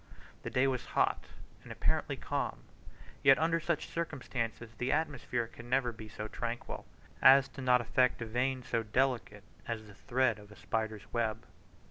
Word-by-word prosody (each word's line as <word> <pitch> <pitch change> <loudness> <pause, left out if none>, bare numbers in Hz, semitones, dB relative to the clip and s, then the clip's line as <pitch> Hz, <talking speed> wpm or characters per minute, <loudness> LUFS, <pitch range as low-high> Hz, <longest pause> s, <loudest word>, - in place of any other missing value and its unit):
The - - -4
day 130 +1 +3
was 130 -2 0
hot - - +2 0.4
and - - -11
apparently - - 0
calm; - - -3 0.6
yet 135 -1 +7
under 165 +1 +2
such 170 0 -1
circumstances, 125 -8 -4
the 125 +1 0
atmosphere 140 -6 0
can 115 +1 -12
never 130 -1 +2
be 110 -1 -10
so 105 +1 -5
tranquil 120 +1 -5 0.3
as 135 +1 +7
not 125 -2 +4
to 120 - -4
affect 125 +1 +2
a - - -4
vane 125 +3 0
so 115 - 0
delicate 115 -2 0 0.2
as 110 -2 -3
the 105 - -13
thread 120 +1 +1
of 105 0 -14
a - - -12
spider's 110 -2 -3
web. 115 -1 -1
120 Hz, 165 wpm, -32 LUFS, 110-135 Hz, 0.6 s, yet